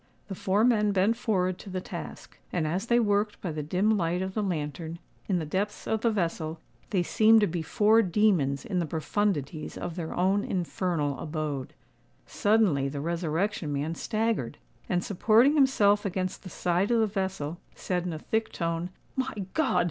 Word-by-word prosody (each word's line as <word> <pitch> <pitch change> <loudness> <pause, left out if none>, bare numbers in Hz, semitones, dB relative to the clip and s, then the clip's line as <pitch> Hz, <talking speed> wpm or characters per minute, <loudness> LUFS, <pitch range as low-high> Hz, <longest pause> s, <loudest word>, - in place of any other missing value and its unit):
The - - -3
four 195 +3 +1
men 210 -4 +3
bent 200 +4 +3
forward 185 -6 0
to 200 - -10
the 185 0 -3
task; - - -8
and 170 -3 0
as 185 +8 -2
they 235 0 +4
worked 205 -1 +1
by 180 - -3
the 155 0 -3
dim 185 +8 +1
light 175 -1 0
of 190 0 -4
the 215 - -1
lantern, 165 -2 -3 0.3
in 190 - +1
the 160 - -2
depths 195 +7 -2
of 220 -1 0
the 235 - +3
vessel, 165 -5 -2 0.3
they 185 -4 +1
seemed 220 +4 +5
to - - +5
be 170 -2 -2
four 215 +7 +4
demons 175 -9 +2
in 185 - -1
the 170 - -1
profundities 155 -2 -2
of 175 -2 -5
their 165 -3 -4
own 190 +3 +2
infernal 170 -5 -1
abode. 150 -4 -4 0.5
Suddenly 205 -11 +2
the 140 +1 -5
Resurrection 170 +2 -1
Man 145 +3 -1
staggered, 215 - -1 0.3
and, 175 -1 +1
supporting 225 +7 +4
himself 215 -8 +4
against 185 -1 -2
the 185 - -9
side 180 +3 0
of 235 -1 +3
the 220 - +4
vessel, 190 -6 -3 0.2
said 180 -2 -2
in 180 - -3
a 160 - -4
thick 220 +8 -2
tone, 170 0 -2 0.3
"My 260 -1 -1 0.2
God! 315 -4 +2
185 Hz, 180 wpm, -28 LUFS, 165-210 Hz, 0.5 s, seemed